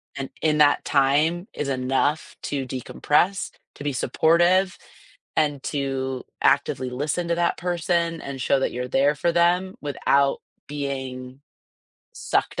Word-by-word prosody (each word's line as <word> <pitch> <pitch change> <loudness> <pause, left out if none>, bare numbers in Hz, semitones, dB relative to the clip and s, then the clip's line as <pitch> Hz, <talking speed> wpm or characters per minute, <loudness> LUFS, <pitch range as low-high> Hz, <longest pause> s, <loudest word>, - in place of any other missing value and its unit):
And 135 -1 -5
in 150 -1 +2
that 145 -1 +4
time 150 +7 +2
is 150 - -3
enough 135 +3 0
to 140 -2 -2
decompress, 150 +8 0 0.2
to - - -9
be 145 -1 -1
supportive, 175 +7 +3 0.6
and 145 -3 +1
to 135 -2 -2 0.2
actively 130 0 +2
listen 150 +7 -2
to 170 - +1
that 170 0 +1
person 170 -1 -1
and 135 -1 -6
show 135 +2 +2
that - - 0
you're 125 +1 -4
there 140 +3 +2
for 170 +4 +1
them 175 +3 +2
without 140 -1 +1 0.3
being 130 -2 -5 0.7
sucked - - -1
145 Hz, 135 wpm, -24 LUFS, 135-170 Hz, 0.7 s, that